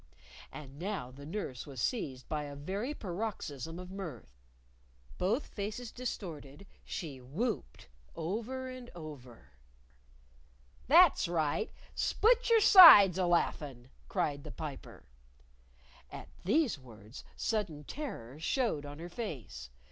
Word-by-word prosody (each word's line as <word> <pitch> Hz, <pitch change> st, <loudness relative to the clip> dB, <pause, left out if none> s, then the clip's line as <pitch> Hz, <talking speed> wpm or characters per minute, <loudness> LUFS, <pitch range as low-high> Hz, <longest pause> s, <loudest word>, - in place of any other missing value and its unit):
And 140 Hz, -2 st, -10 dB
now 185 Hz, -9 st, -4 dB
the 140 Hz, +3 st, -11 dB
nurse 155 Hz, -, -5 dB
was 135 Hz, -3 st, -8 dB
seized 130 Hz, -, -2 dB
by 150 Hz, -1 st, -2 dB
a 145 Hz, 0 st, -8 dB
very 195 Hz, -, -4 dB
paroxysm 175 Hz, -, -5 dB
of 180 Hz, 0 st, -9 dB
mirth. 125 Hz, -, -8 dB, 0.8 s
Both 225 Hz, +10 st, +1 dB
faces 215 Hz, +3 st, -5 dB
distorted, 170 Hz, -, -6 dB, 0.2 s
she 145 Hz, -6 st, -6 dB
whopped 165 Hz, -, -4 dB, 0.3 s
over 230 Hz, +10 st, -4 dB
and 255 Hz, -1 st, -9 dB
over. 130 Hz, -, -11 dB, 1.4 s
"That's 320 Hz, -, +6 dB
right! 165 Hz, +4 st, -1 dB, 0.2 s
Split 480 Hz, +3 st, +2 dB
your 455 Hz, -1 st, +6 dB
sides 210 Hz, -, +10 dB
alaughin'," 145 Hz, -8 st, 0 dB, 0.2 s
cried 145 Hz, -1 st, -1 dB
the 155 Hz, -, -8 dB
Piper. 150 Hz, -2 st, -8 dB, 1.1 s
At -, -, -9 dB, 0.2 s
these 250 Hz, -, +2 dB
words, 110 Hz, -2 st, -13 dB
sudden 190 Hz, -10 st, -2 dB
terror 150 Hz, -, -7 dB
showed 165 Hz, -, -1 dB
on 145 Hz, 0 st, -9 dB
her 170 Hz, +2 st, -7 dB
face. 130 Hz, -, -7 dB
170 Hz, 115 wpm, -32 LUFS, 140-220 Hz, 1.4 s, sides